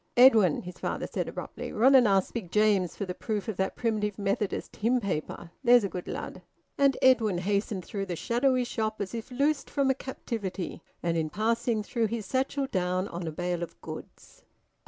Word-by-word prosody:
"Edwin," 225 - +6
his 180 0 -9
father - - -2
said - - -3
abruptly, - - -6
"run 255 +5 +5
and 255 -4 +7
ask 195 -2 +2
Big 220 -7 -4
James 210 -4 +3
for 200 - -3
th' 180 -1 -6
proof 215 -2 -2
of 220 - -2
that 190 0 -1
Primitive 210 -3 -1
Methodist 200 0 -2
hymn 240 +4 +2
paper; 175 -4 -4
there's 245 -2 +6
a 200 - -1
good 180 -1 -6
lad." - - -5 0.3
And 275 -1 +3
Edwin 225 -7 +4
hastened 200 0 -1
through 195 -1 -4
the 175 - -3
shadowy 250 - +1
shop 220 -2 -2
as 200 0 -4
if 230 -1 -5
loosed 275 +2 0
from 275 -2 +2
a - - +3
captivity, 205 -10 -5 0.2
and 170 -1 +1
in 160 -1 0
passing 230 +3 0
threw 230 +1 0
his 220 -1 -4
satchel 270 +5 0
down 185 -5 -1
on 170 0 -5
a - - -2
bale 175 +2 -2
of 170 - -6
goods. - - -10
215 Hz, 195 wpm, -28 LUFS, 185-245 Hz, 0.3 s, and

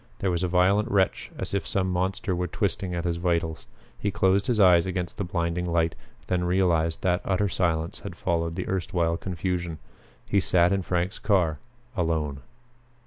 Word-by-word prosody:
There 95 - 0
was 85 -1 -1
a 90 - +1
violent 95 +4 +3
wrench 95 -2 +1
as - - -4
if 100 - -1
some 95 -1 0
monster 95 +1 -1
were 90 0 -1
twisting 95 0 -2
at 85 - -2
his 85 -1 0
vitals. 85 -2 -1 0.3
He 105 - 0
closed 100 0 +2
his 120 -3 +1
eyes 90 -3 +6
against 90 +1 -3
the - - 0
blinding 85 -1 -1
light, 85 -2 +1 0.3
then 90 -1 0
realized 85 -3 +1
that 90 0 +2
utter 100 +2 +1
silence 85 -3 -1
had - - -8
followed 85 -1 -1
the 90 - -3
erstwhile 85 -3 0
confusion. 90 -2 -3 0.5
He 100 - +3
sat 90 -1 +3
in 100 - +1
Frank's 90 +1 -1
car 90 -8 +2 0.4
alone. 80 -6 -1
90 Hz, 175 wpm, -26 LUFS, 85-95 Hz, 0.5 s, eyes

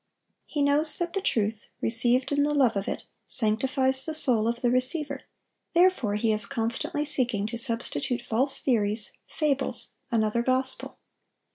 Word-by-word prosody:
He 295 -2 -2
knows 295 +2 +6
that 345 -1 -3
the 390 - -2
truth, 215 - -2
received 245 +3 +1
in 285 0 +1
the 295 +1 0
love 255 -6 +2
of 200 0 -3
it, - - -4 0.2
sanctifies 260 +4 +3
the 315 +1 -3
soul 245 -8 +3
of 235 +1 -3
the 245 - +1
receiver; 275 +2 -1 0.5
therefore 345 - +2
he 220 +1 0
is 210 -1 +2
constantly 235 +7 -3
seeking 250 -8 -1
to 225 +2 -5
substitute 245 +1 -2
false 255 +4 0
theories, 215 -4 0 0.2
fables, 280 -4 -2 0.2
another 225 -1 0
gospel. 260 +1 -2
255 Hz, 150 wpm, -26 LUFS, 225-285 Hz, 0.5 s, knows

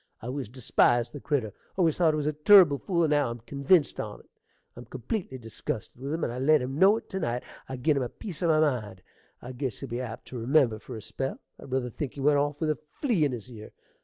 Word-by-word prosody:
I - - -11
always 130 -2 -4
despised 120 -1 +2
the 145 - -6
critter; 130 -9 -1 0.2
always 165 -5 +3
thought 165 -3 +4
he - - 0
was 150 - -2
a 150 - 0
turrible 150 -2 +6
fool, 175 -4 0
and 155 - +1
now 145 -4 +2
I'm 120 - -5
convinced 140 +6 +2
on't. - - -6 0.5
I'm 120 - -10
completely 130 - -4
dizgusted 115 -2 -6
with 140 +2 -4
him; 160 +1 -2
and 120 - -1
I 125 - -5
let 150 +3 +4
him 135 +3 -4
know 200 +3 +6
it - - -9
to 190 - -2
night. 120 -5 -2 0.3
I 130 - -4
gin 145 +4 +2
him - - +1
a 125 - -2
piece 175 - -8
o' 175 - +2
my 155 -1 +4
mind't 110 -11 -1 0.4
I 125 - -7
guess 130 -3 -4
he'll 135 - -7
be 120 +2 -3
apt 115 -3 -7
to 125 - -6
remember 120 -2 +3
for - - -9
a 110 - -8
spell. 135 +4 -4 0.2
I - - -11
ruther 130 -2 -2
think 135 +2 -5
he - - -9
went 145 +1 +3
off 145 0 -1
with 155 -2 +1
a 150 - -4 0.2
flea 225 - +2
in 140 - 0
his 120 0 -7
ear. 110 -2 -11
135 Hz, 255 wpm, -28 LUFS, 120-155 Hz, 0.5 s, turrible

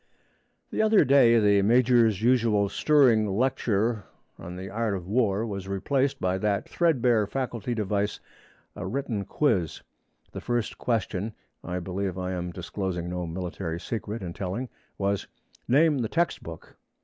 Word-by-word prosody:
The - - 0
other 220 -1 +5
day 125 -3 +6
the 100 -2 +4
major's 115 -1 +3
usual 115 -5 +3
stirring 125 -4 +4
lecture 110 -1 0 0.3
on 90 +1 -8
the 95 +1 -6
art 110 0 -1
of 90 -2 -6
war 110 -1 +1
was 100 -3 -5
replaced 130 +8 0
by 95 +1 0
that 100 0 0
threadbare 125 - +2
faculty 120 -1 -3
device, 105 -1 -1 0.6
a 100 -2 -5
written 115 -3 -3
quiz. 100 - 0 0.5
The - - -7
first 120 -2 -2
question 110 -2 -1 0.3
(I 90 +1 -4
believe 95 +1 -3
I 90 0 -3
am 90 -1 -3
disclosing 90 0 -4
no 90 -1 -3
military 85 -1 -4
secret 110 +1 -5
in 85 -2 -5
telling) 100 +8 -4 0.3
was, 100 0 -1 0.4
'Name 150 +3 +4
the 115 -3 -1
textbook.' 125 - -3
105 Hz, 140 wpm, -26 LUFS, 95-120 Hz, 0.6 s, day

